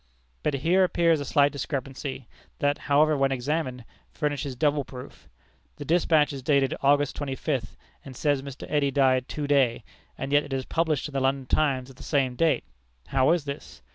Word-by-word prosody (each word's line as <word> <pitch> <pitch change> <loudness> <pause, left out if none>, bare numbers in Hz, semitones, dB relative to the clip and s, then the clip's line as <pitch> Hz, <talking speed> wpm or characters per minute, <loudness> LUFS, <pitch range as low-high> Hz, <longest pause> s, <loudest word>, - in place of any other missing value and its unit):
But 150 - 0
here 170 +7 +3
appears 170 -3 +2
a 145 - -4
slight 145 -1 +3
discrepancy, 135 -2 -5 0.3
that, 145 0 0
however, 150 +2 +4
when 135 -1 +1
examined, 130 -1 -2 0.3
furnishes 145 -3 -2
double 145 +2 +1
proof. 125 -1 -11 0.5
The 145 - -8
despatch 160 -2 +3
is 135 - -6
dated 140 -1 +2
August 145 0 +3
twenty 140 -2 -3
fifth, 130 -5 -3 0.3
and 135 -2 -10
says 145 0 +1
Mr. 135 -1 -8
Eddy 145 -2 +1
died 130 -2 +2
to 150 - -3
day, 135 -5 +2 0.3
and 135 - -4
yet 145 0 +5
it 140 - -7
is 130 -1 -2
published 160 -4 0
in 150 - -12
the 135 - 0
London 135 0 0
Times 135 -2 0
of 130 - -19
the - - -13
same 135 -4 0
date! 160 +4 +2 0.5
How 130 -1 +3
is 170 -4 +1
this? 140 - -8
140 Hz, 185 wpm, -26 LUFS, 130-150 Hz, 0.5 s, yet